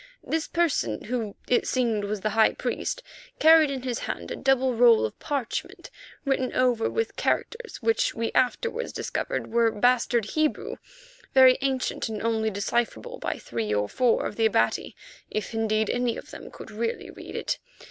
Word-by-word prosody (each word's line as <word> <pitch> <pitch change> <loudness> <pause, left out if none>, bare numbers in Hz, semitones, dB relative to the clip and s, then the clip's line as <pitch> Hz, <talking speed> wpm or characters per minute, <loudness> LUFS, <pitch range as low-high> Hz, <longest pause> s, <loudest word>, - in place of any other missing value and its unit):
This 320 0 -1
person, 260 - 0
who 225 -3 -3
it 245 - +2
seemed 230 -5 0
was 205 0 -3
the 215 - -1
high 220 +1 +4
priest, - - -3 0.3
carried 320 -1 +6
in 265 -2 -4
his 250 -3 -2
hand - - -5
a - - -2
double 265 -1 +2
roll 235 - +5
of 110 - -6
parchment 275 -5 -4 0.3
written 265 -2 0
over 245 -3 +2
with 455 0 -2
characters 460 0 -2
which 455 0 +2
we 230 0 -2
afterwards 465 - 0
discovered - - -3
were 235 -1 +4
bastard 235 0 +2
Hebrew, 310 -1 -1 0.6
very 260 -1 +7
ancient 265 -4 -1
and 215 -1 -4
only 220 -1 +1
decipherable 200 - -2
by - - -2
three 115 -3 -4
or 105 0 +1
four 245 - +2
of - - -5
the 225 -1 +4
Abati, 215 - 0 0.3
if 215 +1 -4
indeed 220 -1 +1
any 245 0 0
of - - -10
them - - -9
could - - -11
really 225 +2 -3
read - - -10
it. - - -2
235 Hz, 170 wpm, -26 LUFS, 220-265 Hz, 0.6 s, very